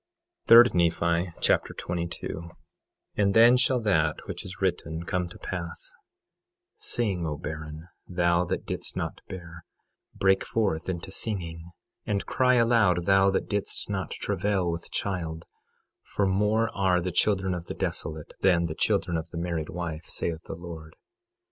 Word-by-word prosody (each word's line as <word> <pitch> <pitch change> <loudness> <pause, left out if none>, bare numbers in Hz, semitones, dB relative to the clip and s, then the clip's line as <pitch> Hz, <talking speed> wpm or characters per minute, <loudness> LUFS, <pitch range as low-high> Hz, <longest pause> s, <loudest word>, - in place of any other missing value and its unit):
3 115 +1 +11
Nephi 85 +1 +2
Chapter - - +2
22 85 -1 -4
22:1 85 +1 -6 0.7
And 100 -1 +2
then 120 +2 +8
shall 125 0 +3
that 80 -8 +1
which - - -5
is 95 +1 -8
written 85 -3 -1
come 90 0 -1
to - - -11
pass: 85 -2 -5 0.8
Sing, 95 -8 -1
O 75 -1 -3
barren, 75 +1 -7 0.2
thou 85 -1 +2
that - - -3
didst - - -3
not - - -3
bear; 85 -2 -9 0.5
break 95 0 +3
forth 95 -7 -1
into 90 +1 -4
singing, 85 -6 -3 0.3
and 100 -1 -1
cry 125 -1 +3
aloud, 115 -7 +3
thou 95 0 +5
that 95 - 0
didst 105 0 -2
not 95 -2 -2
travail 95 -2 -1
with 85 0 -6
child; 80 -5 -3 0.6
for 100 - -1
more 105 +4 +1
are 95 -2 +3
the 90 +1 -2
children 95 -1 +2
of 85 -1 -5
the - - -5
desolate 80 -1 -3
than 90 -3 +3
the 80 - -3
children 85 - +1
of 80 - -5
the 85 - -7
married 85 -2 -2
wife, 85 -2 -5
saith 80 -1 -3
the - - -6
Lord. 80 -2 -9
90 Hz, 155 wpm, -27 LUFS, 85-100 Hz, 0.8 s, 3